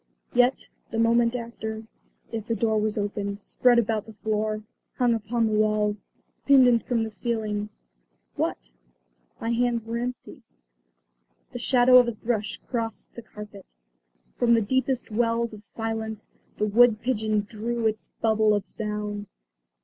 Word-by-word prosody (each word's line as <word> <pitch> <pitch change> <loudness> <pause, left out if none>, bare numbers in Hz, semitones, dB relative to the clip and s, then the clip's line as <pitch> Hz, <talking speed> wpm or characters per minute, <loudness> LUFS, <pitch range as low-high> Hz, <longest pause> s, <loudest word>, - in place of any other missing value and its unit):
Yet, 245 +2 +3 0.2
the 225 - -4
moment 230 +1 +3
after, 220 -2 -5 0.5
if 225 -2 -5
the 230 - 0
door 220 0 +1
was 215 0 -1
opened, 200 -1 -2
spread 240 +4 +2
about 220 -2 +1
the 220 - -10
floor, 215 0 -2 0.3
hung 245 -2 +3
upon 230 +1 0
the 215 - 0
walls, 210 -1 +1 0.4
pendant 250 -4 +5
from 235 -3 +1
the 220 - -4
ceiling 210 -2 -2 0.7
what? - - -3 0.7
My 230 - -2
hands 235 -1 +1
were 230 +1 -3
empty. 250 0 -6 1.1
The 245 - -6
shadow 250 +1 +6
of 245 - +3
a 235 - -2
thrush 220 -2 -2
crossed 230 -3 -4
the 235 - -8
carpet; 210 - -12 0.6
from 235 -1 +4
the 230 - +4
deepest 260 +2 -1
wells 230 +1 0
of 210 - -10
silence 220 0 -5 0.3
the 210 - +1
wood 225 +1 +5
pigeon 215 -4 0
drew 225 +3 -3
its 220 -1 0 0.2
bubble 220 -1 +4
of 205 - -2
sound. 210 -1 -4
225 Hz, 145 wpm, -26 LUFS, 210-235 Hz, 1.1 s, shadow